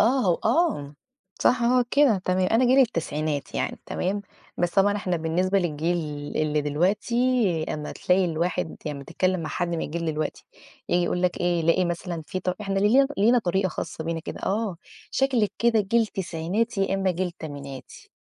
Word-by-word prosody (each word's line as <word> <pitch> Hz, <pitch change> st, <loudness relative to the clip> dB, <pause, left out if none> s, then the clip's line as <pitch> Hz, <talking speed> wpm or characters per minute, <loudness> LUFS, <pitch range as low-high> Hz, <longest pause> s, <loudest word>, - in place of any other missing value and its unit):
آه، 235 Hz, -2 st, +3 dB
و 170 Hz, -, +1 dB
آه. 225 Hz, -, +1 dB, 0.5 s
صح 240 Hz, -1 st, +3 dB
هو 250 Hz, +1 st, +4 dB
كده، 280 Hz, -8 st, +4 dB
تمام. 185 Hz, 0 st, +1 dB
أنا 235 Hz, +3 st, +4 dB
جيل 255 Hz, +2 st, +4 dB
التسعينات 155 Hz, -, 0 dB
يعني -, -, -2 dB
تمام، 200 Hz, +3 st, -2 dB, 0.4 s
بس 175 Hz, 0 st, +1 dB
طبعًا 205 Hz, +2 st, +3 dB
إحنا 180 Hz, -3 st, -1 dB
بالنسبة 175 Hz, +4 st, +1 dB
للجيل 170 Hz, 0 st, 0 dB, 0.4 s
اللي 155 Hz, -1 st, +1 dB
دلوقتي 175 Hz, +11 st, 0 dB, 0.6 s
أمّا 150 Hz, -1 st, -5 dB
تلاقي 185 Hz, +1 st, +2 dB
الواحد 170 Hz, -1 st, -1 dB
يعني 150 Hz, -2 st, -3 dB
أمّا 140 Hz, -, -9 dB
تتكلّم 185 Hz, +5 st, 0 dB
مع 160 Hz, -, -4 dB
حد 175 Hz, -, -2 dB
من 170 Hz, -1 st, -2 dB
الجيل 170 Hz, +2 st, -3 dB
دلوقتي، 155 Hz, 0 st, -3 dB, 0.4 s
ييجي 175 Hz, 0 st, +2 dB
يقول 180 Hz, +1 st, -1 dB
لك 180 Hz, -1 st, 0 dB
إيه، 175 Hz, -1 st, +1 dB
يلاقي 165 Hz, +3 st, +3 dB
مثلًا 170 Hz, -1 st, -3 dB
فيه 185 Hz, -, -3 dB
طر 180 Hz, 0 st, -2 dB
إحنا 195 Hz, -1 st, -1 dB
لي 235 Hz, +8 st, +5 dB
لينا 230 Hz, +5 st, +5 dB
طريقة 190 Hz, -2 st, 0 dB
خاصة 160 Hz, -1 st, -5 dB
بينا 165 Hz, 0 st, -2 dB
كده. -, -, -7 dB
آه، 205 Hz, -2 st, -1 dB, 0.3 s
"شكلِك 255 Hz, -6 st, +1 dB
كده 235 Hz, -2 st, +3 dB
جيل 225 Hz, +3 st, +2 dB
تسعيناتي 195 Hz, +4 st, -2 dB
يا 195 Hz, -, -1 dB
إمّا 195 Hz, -1 st, +1 dB
جيل 180 Hz, 0 st, -2 dB
تمانيناتي". 140 Hz, -6 st, -9 dB
185 Hz, 180 wpm, -25 LUFS, 165-210 Hz, 0.6 s, لي